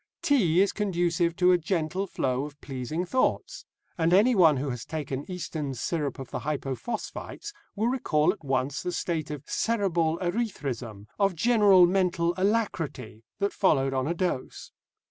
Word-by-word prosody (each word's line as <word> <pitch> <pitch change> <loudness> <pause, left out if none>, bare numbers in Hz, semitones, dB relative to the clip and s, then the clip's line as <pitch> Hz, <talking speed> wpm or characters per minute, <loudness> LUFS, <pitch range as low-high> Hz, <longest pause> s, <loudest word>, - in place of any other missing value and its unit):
Tea 185 - +3
is 200 - +3
conducive 175 -4 0
to 180 0 +4
a 180 - +4
gentle 175 +2 -1
flow 130 -6 -1
of 145 -1 -11
pleasing 135 +6 -4
thoughts, 255 +8 -1 0.3
and 165 +1 +3
anyone 190 - +5
who 135 +1 -2
has 120 -1 -5
taken 145 -2 -5
Easton's 155 -8 -4
syrup 150 -1 -2
of 135 -2 -8
the - - -3
hypophosphites 155 - -5 0.2
will 215 +2 0
recall 165 - +2
at - - -17
once 135 +1 -1
the 180 - -3
state 165 -3 -2
of 150 -2 -6
cerebral 175 -8 0
erethrism, 140 - -3
of 195 -3 +2
general 205 -2 +5
mental 175 -2 +1
alacrity, 185 - -1 0.2
that 200 0 -1
followed 135 -8 +2
on 130 +1 0
a 170 - -1
dose. 170 -7 -3
170 Hz, 150 wpm, -27 LUFS, 140-195 Hz, 0.3 s, anyone